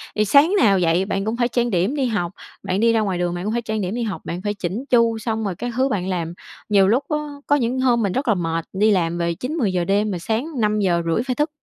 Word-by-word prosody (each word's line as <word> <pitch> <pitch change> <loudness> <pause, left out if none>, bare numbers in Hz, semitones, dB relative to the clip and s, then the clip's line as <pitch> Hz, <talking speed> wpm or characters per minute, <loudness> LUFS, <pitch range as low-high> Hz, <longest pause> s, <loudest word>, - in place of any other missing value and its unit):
thì 215 - +2
sáng 290 - +5
nào 200 -5 +4
dậy 175 +2 +2
bạn 195 0 -2
cũng 225 +2 -2
phải 240 - +2
trang 240 0 0
điểm 195 - 0
đi 270 -3 0
học, 190 -6 -1 0.3
bạn 185 +2 -1
đi 230 0 +4
ra 225 - +3
ngoài 190 -4 -1
đường 175 0 -1
bạn 175 - -4
cũng 215 - -1
phải 235 - 0
trang 220 -2 -3
điểm 190 +4 -3
đi 240 - -2
học, 210 -3 -4
bạn 175 +2 -4
phải 205 +1 -2
chỉn 200 +7 -4
chu 230 -2 +3
xong 220 0 -2
rồi 185 -3 -2
các 245 +4 -5
thứ 265 +1 +2
bạn 190 -4 -2
làm, 170 -2 -2 0.4
nhiều 195 -2 +5
lúc 245 +7 +2
á 300 - +1 0.3
có 290 - +4
những 255 -1 0
hôm 240 -3 +3
mình 195 - 0
rất 265 0 -2
là 220 - +4
mệt 165 -1 -2
đi 210 +3 +3
làm 175 -3 +1
về 170 0 0
9:00-10:00 215 - -1
đêm 205 +1 +1
mà 180 - -2
sáng 220 - -2
5:30 195 -3 +1
phải 255 - 0
thức. 300 +1 0
210 Hz, 275 wpm, -21 LUFS, 180-240 Hz, 0.4 s, sáng